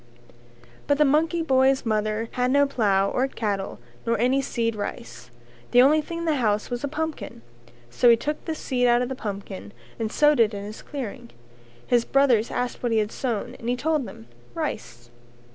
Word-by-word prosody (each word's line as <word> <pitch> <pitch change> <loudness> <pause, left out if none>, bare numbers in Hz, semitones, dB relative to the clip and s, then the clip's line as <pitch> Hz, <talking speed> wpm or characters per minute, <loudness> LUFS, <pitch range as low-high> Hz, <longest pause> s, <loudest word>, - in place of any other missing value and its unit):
But 285 - +3
the 300 - +5
monkey 320 +4 +2
boy's 265 -3 +3
mother 215 0 0
had 250 0 0
no 285 +2 +4
plough 200 -7 +1
or 260 +2 +1
cattle 205 -6 -3 0.3
nor 230 0 0
any 255 +5 +2
seed 230 -3 -1
rice; 120 - -7 0.4
the 245 - +4
only 305 +3 +5
thing 335 +3 -7
in 335 - -4
the 310 -3 +1
house 215 -2 0
was 245 +1 -3
a - - 0
pumpkin, 315 - -5 0.5
so 245 - +4
he 230 - +7
took 300 +6 -4
the 320 - -2
seed 250 -5 0
out 240 +1 +4
of 250 - -4
the 265 - -3
pumpkin 200 -3 -6 0.3
and 220 -1 -2
sowed 295 0 +4
it 220 -2 +3
in 200 - -5
his 210 +2 -8
clearing. 245 -4 -7 0.6
His 240 -1 +3
brothers 255 -5 +3
asked 245 0 -3
what 240 - -1
he 225 - +2
had 215 0 0
sown 235 -6 -3
and 235 - -4
he 245 - +2
told 300 -1 0
them 150 -12 -11 0.3
Rice. 120 0 -5
245 Hz, 195 wpm, -24 LUFS, 215-275 Hz, 0.6 s, he